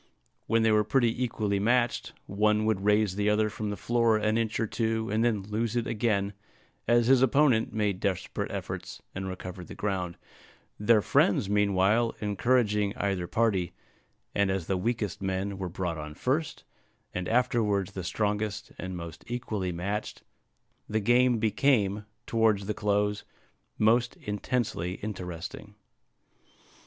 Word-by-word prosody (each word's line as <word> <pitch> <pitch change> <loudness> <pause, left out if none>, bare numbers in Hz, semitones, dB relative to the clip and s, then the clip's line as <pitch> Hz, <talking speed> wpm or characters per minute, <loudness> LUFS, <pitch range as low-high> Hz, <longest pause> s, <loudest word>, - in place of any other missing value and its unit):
When 115 0 +3
they 110 - +4
were 105 0 +4
pretty 120 +2 +1
equally 105 -4 -1
matched, 120 +3 +1
one 105 +2 +2
would 110 -3 0
raise 105 -2 +3
the 105 +1 +1
other 105 0 +2
from 105 0 -4
the 105 - -3
floor 115 -2 +2
an 110 0 +1
inch 115 -1 0
or 115 - +2
two, 110 0 -1
and 110 +2 +2
then 110 -4 +1
lose 110 +3 -2
it 120 -1 0
again, 105 -3 0 0.5
as 120 0 +4
his 130 +1 +5
opponent 130 -3 +3
made 105 -3 0
desperate 95 -2 -2
efforts, - - -6
and 95 0 -4
recovered 90 -1 -7
the - - -9
ground, 95 -4 -2 0.6
their 105 0 +4
friends 100 0 +2
meanwhile 105 +3 +2
encouraging 105 -1 +1
either 95 -3 -1
party; 95 -2 +1 0.6
and 100 -1 +2
as 95 -3 -1
the 95 - 0
weakest 105 -1 -2
men 95 +1 -2
were 95 -2 -3
brought 85 -2 -3
on 75 0 -7
first, 145 - -1 0.5
and 90 0 -3
afterwards 110 -5 +1
the 95 -2 -5
strongest 105 +2 -2
and 95 0 -5
most 85 -1 -8
equally 110 -6 -3
matched, 100 +5 -4 0.7
the 110 - +1
game 120 +3 +4
became, 105 -3 +1 0.2
towards 110 -3 +2
the 105 - -1
close, 105 0 0 0.5
most 120 +3 +3
intensely 105 -3 -2
interesting. 95 0 -6
105 Hz, 145 wpm, -28 LUFS, 95-115 Hz, 0.7 s, his